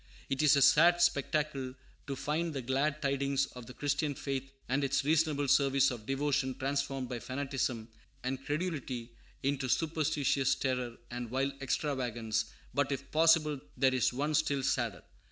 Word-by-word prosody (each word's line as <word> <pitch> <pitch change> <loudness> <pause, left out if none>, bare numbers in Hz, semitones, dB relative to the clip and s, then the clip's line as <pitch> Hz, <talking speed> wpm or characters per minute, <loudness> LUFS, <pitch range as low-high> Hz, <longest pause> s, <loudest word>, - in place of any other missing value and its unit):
It 135 - +1
is 150 0 +6
a 140 - +5
sad 170 +5 +6
spectacle 145 -5 0 0.3
to 140 - -3
find 155 +3 -2
the 135 - -3
glad 140 +5 0
tidings 140 0 +1
of 125 -2 -9
the 125 - -9
Christian 145 0 -1
faith 135 0 -4 0.2
and 135 +3 0
its 135 0 +1
"reasonable 150 -2 +2
service" 135 0 +4
of 115 -4 -7
devotion 135 -1 0
transformed 135 -1 -2
by 120 -1 -4
fanaticism 130 -3 -2 0.4
and 130 +1 -3
credulity 140 -6 -3 0.3
into 135 -1 0
superstitious 150 -3 +1
terror 125 -3 -2
and 120 -1 -5
wild 135 +3 0
extravagance; 120 -6 -1 0.3
but, 140 +1 +1
if 135 - -4
possible, 155 -2 +4 0.2
there 130 0 +3
is 130 -3 +2
one 145 +5 -1
still 145 -2 +1
sadder. 120 -8 -1
135 Hz, 155 wpm, -32 LUFS, 130-145 Hz, 0.4 s, is